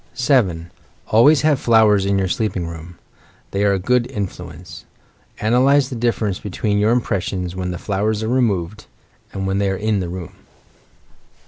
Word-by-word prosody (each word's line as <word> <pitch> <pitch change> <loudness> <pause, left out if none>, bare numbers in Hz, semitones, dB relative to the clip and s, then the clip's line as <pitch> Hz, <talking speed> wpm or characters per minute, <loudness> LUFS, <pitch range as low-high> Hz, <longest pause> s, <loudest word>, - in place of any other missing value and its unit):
7. 100 - +1 0.4
Always 135 +7 +5
have 150 -3 +2
flowers 105 -4 +3
in 100 0 +1
your 95 -1 0
sleeping 105 -4 -2
room. 85 +1 -9 0.5
They 100 +1 -1
are 100 -1 +3
a - - +1
good 125 +5 0
influence. 90 - -7 0.6
Analyse 130 +5 +3
the 130 - -5
difference 115 -4 -1
between 105 +1 -2
your 105 +1 +2
impressions 95 -6 -1
when 90 -1 -3
the 90 - -4
flowers 105 +3 -2
are - - -2
removed; 110 -5 -1 0.4
and 95 0 -4
when 95 +1 -1
they 100 -1 +1
are 95 - -2
in 105 0 0
the 90 -2 -4
room. 90 -2 -7
100 Hz, 160 wpm, -19 LUFS, 90-115 Hz, 0.6 s, Always